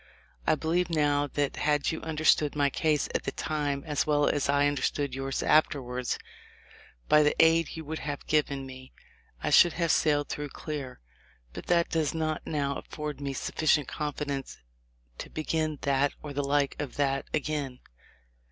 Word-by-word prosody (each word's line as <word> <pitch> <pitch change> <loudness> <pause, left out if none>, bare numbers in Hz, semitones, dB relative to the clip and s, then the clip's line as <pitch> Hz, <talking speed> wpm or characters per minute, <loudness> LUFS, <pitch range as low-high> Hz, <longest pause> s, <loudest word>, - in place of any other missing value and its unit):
I 155 - +5
believe 165 +3 0
now 145 -3 +2
that 145 -1 0
had 150 -1 +1
you 160 - -5
understood 155 -2 +2
my 145 -1 +2
case 155 0 +1
at - - 0
the - - -1
time 145 -1 -2
as 150 -2 -1
well 145 -1 +3
as 145 -1 0
I 145 0 +4
under 145 -1 -1
stood 140 -3 -1
yours 135 +1 -2
afterwards, 125 -5 +1 0.9
by 150 - +6
the 150 0 +3
aid 165 0 +4
you 160 - -6
would 160 +2 -4
have 145 -1 -5
given 140 -3 0
me 130 0 -11 0.5
I - - 0
should 175 - +7
have 170 -2 +1
sailed 145 -1 +2
through 150 -1 -4
clear; 140 - -6 0.5
but - - -8
that 170 -1 +3
does 160 -1 0
not 155 -1 -1
now 140 -3 -1
afford 150 -2 -6
me 140 -1 -3
sufficient 150 +1 +1
confidence 145 -2 -4 0.6
to - - -6
begin 155 -1 -2
that 140 0 +2
or 145 -1 -6
the 145 - -1
like 140 0 +1
of 145 -4 -5
that 135 -1 0
again 145 -4 -2
145 Hz, 170 wpm, -28 LUFS, 140-155 Hz, 0.9 s, should